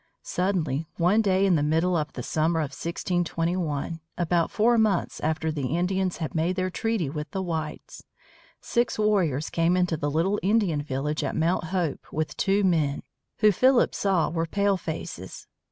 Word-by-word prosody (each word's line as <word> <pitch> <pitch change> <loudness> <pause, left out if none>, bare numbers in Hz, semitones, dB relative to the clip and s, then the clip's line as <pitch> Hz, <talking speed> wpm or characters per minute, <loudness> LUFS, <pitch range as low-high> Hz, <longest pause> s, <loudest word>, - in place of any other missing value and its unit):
Suddenly, 165 -6 -1
one 185 +6 +3
day 195 -2 +2
in 190 - +4
the 155 - +3
middle 160 +4 +2
of 150 -3 -2
the 125 - -6
summer 160 +4 +1
of 145 - -3
1621, 170 -2 -2 0.2
about 170 -1 +1
four 230 +2 +3
months 210 -5 +1
after 160 +1 -1
the 145 +1 -2
Indians 185 +1 0
had 160 -3 -4
made 170 +3 0
their 185 0 -1
treaty 225 -5 -1
with 150 +2 -5
the 190 - -3
whites, 160 -3 -5 0.6
six 240 0 0
warriors 185 -9 +1
came 170 +2 +2
into 180 -2 +1
the 145 -1 -2
little 170 +7 +1
Indian 195 -7 +2
village 145 +2 -2
at - - -2
Mount 165 +1 +1
Hope 170 -4 -3
with 155 -1 -2
two 200 +1 +1
men, 155 -6 +1 0.4
who 215 -1 +7
Philip 255 +5 +3
saw 185 -7 +1
were 165 0 -1
palefaces. 175 - -2
170 Hz, 165 wpm, -26 LUFS, 155-190 Hz, 0.6 s, who